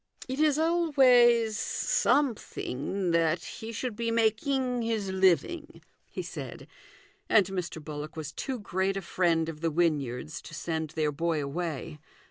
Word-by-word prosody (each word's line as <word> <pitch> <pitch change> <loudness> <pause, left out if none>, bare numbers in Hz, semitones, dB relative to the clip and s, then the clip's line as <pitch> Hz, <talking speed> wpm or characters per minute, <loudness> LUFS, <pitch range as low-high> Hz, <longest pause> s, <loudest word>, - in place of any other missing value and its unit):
" - - -13
It 260 +2 -4
is 305 -2 +4
always 255 -9 +4
something 195 - 0
that 165 0 +2
he 225 +1 -7
should 230 0 -4
be 230 +1 -2
making 245 +3 +1
his 220 -4 -1
living," 190 - +1 0.3
he - - -5
said, - - -7 0.6
and 210 -3 +6
Mr. 180 -3 -4
Bullock 150 0 -6
was 155 -2 -5
too 265 -2 -3
great 195 -2 -1
a 195 - -4
friend 170 -2 +1
of 160 -2 -7
the 165 - +1
Wynyards 155 -3 -1
to 155 - -10
send 160 -1 -3
their 155 -1 0
boy 160 0 -1
away. 155 0 -4
190 Hz, 145 wpm, -29 LUFS, 160-240 Hz, 0.6 s, and